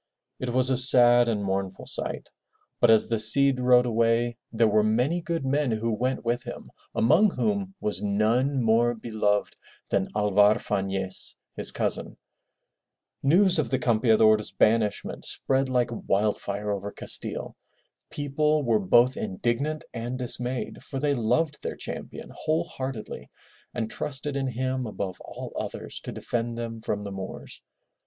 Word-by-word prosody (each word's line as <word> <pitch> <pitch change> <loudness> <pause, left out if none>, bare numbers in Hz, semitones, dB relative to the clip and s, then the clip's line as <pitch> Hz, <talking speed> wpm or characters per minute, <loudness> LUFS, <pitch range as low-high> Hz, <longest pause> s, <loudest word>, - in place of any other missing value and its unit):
It 130 - -3
was 130 +2 +1
a 130 - +2
sad 120 -2 +5
and 105 -3 -1
mournful 95 -1 -3
sight. - - -4 0.5
But 120 - +4
as 110 -1 +6
the 115 -1 0
Cid 135 +4 +6
rode 125 0 +5
away 115 0 +1 0.2
there 115 0 +3
were 105 0 +3
many 125 +11 +1
good 165 -4 -3
men 140 +1 +1
who 115 +1 -1
went 125 +3 -2
with 120 +1 0
him, - - -9 0.2
among 160 - +4
whom 200 -1 -2
was 105 -7 -1
none 115 +6 +1
more 115 +2 +3
beloved 110 -2 -1 0.4
than 95 -1 +1
Alvar 105 0 +4
Fanez, 95 -2 -1 0.2
his - - 0
cousin. - - -3 1.0
News 175 +5 +4
of 135 -7 0
the 130 - +1
Campeador's 110 -3 +3
banishment 110 -2 0
spread 135 0 0
like 125 -2 +1 0.2
wild 105 +2 +1
fire 105 +1 -3
over 100 0 -3
Castile. - - -3 0.5
People 150 +1 0
were 115 -4 +2
both 120 +6 +4
indignant 120 +10 -2
and 120 +2 -4
dismayed 125 0 -3
for 135 - -7
they 145 +1 +1
loved 140 +6 0
their - - -4
champion - - -7
whole 160 +2 0
heartedly 130 -8 -7 0.4
and 110 -2 -4
trusted 145 0 -4
in 135 -1 -1
him 130 0 -2
above 95 -3 -5
all - - -8
others - - -5
to - - -6
defend 115 0 -3
them 115 -1 -5
from 105 -2 -3
the 100 - -6
Moors. 95 -1 -8
120 Hz, 150 wpm, -26 LUFS, 110-135 Hz, 1.0 s, as